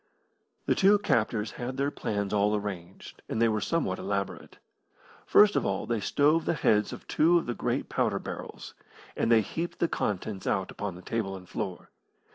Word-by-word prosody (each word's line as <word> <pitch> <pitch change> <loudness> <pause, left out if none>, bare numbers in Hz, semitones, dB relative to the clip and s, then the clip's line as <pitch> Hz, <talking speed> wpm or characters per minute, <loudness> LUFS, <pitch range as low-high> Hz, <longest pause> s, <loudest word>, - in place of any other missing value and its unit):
The - - +3
two 200 +1 +5
captors 115 - 0
had 125 +1 -5
their 140 +1 0
plans 100 -6 -2
all 105 +1 +3
arranged, 95 -3 -6
and 110 - -2
they 115 - +5
were 110 -1 0
somewhat 100 - -1
elaborate. 100 0 -4 0.7
First 210 0 +6
of - - +2
all 95 -1 -1
they 115 -2 -1
stove 150 +9 +2
the - - +1
heads 105 -7 +2
of - - -9
two 170 +3 +4
of 170 - -1
the 120 - -2
great - - -2
powder - - 0
barrels, - - -7 0.4
and 115 - +1
they 115 -1 +6
heaped 165 - -4
the 170 - +2
contents 100 - -3
out 95 -2 0
upon 100 -3 -5
the 90 - -12
table 110 -4 -2
and 90 -1 -11
floor. - - -5
110 Hz, 185 wpm, -28 LUFS, 100-140 Hz, 0.7 s, First